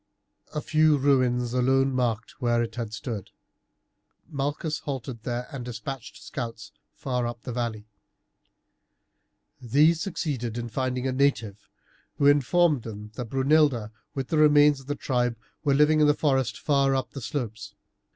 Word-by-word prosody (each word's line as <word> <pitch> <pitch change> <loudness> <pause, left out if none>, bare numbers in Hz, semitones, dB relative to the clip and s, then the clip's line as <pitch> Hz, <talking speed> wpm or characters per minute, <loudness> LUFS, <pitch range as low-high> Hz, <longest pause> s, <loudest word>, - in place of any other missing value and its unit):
A 150 - -1
few 155 -1 +3
ruins 125 -3 +2
alone 135 +2 +2
marked 120 +1 -2
where 120 -1 +2
it 115 - -5
had 115 -3 -4
stood. 110 -1 -5 1.0
Malchus 150 +1 -2
halted 130 -4 -5
there 120 +1 -3
and 135 -3 -6
despatched 125 +2 -7
scouts 115 -5 -6 0.2
far 125 -3 -2
up 120 -1 -7
the 125 - -5
valley. 115 -3 -3 1.8
These 150 +7 +3
succeeded 135 - -3
in 120 0 -4
finding 130 +2 -2
a 130 - +1
native, 125 -7 0 0.5
who 140 - +1
informed 145 +1 +4
them 105 -1 -8
that 115 +1 -6
Brunilda 135 -4 +2 0.2
with 135 -2 -3
the 160 - +1
remains 150 -1 +6
of 135 - -15
the 145 - -2
tribe 125 -4 -1 0.3
were 140 -3 +3
living 150 +2 +4
in 150 - +6
the 150 - +4
forests 135 -7 +1
far 140 -2 +2
up 130 - -2
on - - -35
the 140 - -6
slopes. 115 -3 -5
130 Hz, 150 wpm, -26 LUFS, 120-145 Hz, 1.8 s, remains